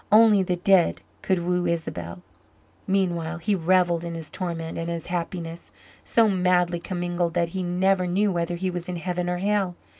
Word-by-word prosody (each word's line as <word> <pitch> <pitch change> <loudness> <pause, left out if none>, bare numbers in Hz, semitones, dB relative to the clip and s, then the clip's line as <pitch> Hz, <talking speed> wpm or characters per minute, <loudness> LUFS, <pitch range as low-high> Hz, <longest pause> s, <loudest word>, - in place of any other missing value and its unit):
Only 215 -2 +7
the 180 -1 0
dead 180 0 +3 0.2
could 180 -3 0
woo 180 0 +1
Isabel. 90 - -4 0.6
Meanwhile 175 -3 0
he 170 +5 0
revelled 175 -1 +2
in 170 -1 -5
his 160 -2 -7
torment 165 -3 -4
and 165 0 -3
his 170 -1 -4
happiness 170 - -4 0.3
so 230 -1 +3
madly 180 -3 +2
commingled 175 -2 -2
that 170 -1 +1
he 190 +2 -4
never 180 +1 +1
knew 200 +3 +2
whether 175 -1 -1
he 185 +1 -2
was 175 0 -5
in 180 - -3
heaven 175 +1 -2
or 180 - -1
hell. 195 -1 0
175 Hz, 175 wpm, -25 LUFS, 170-185 Hz, 0.6 s, Only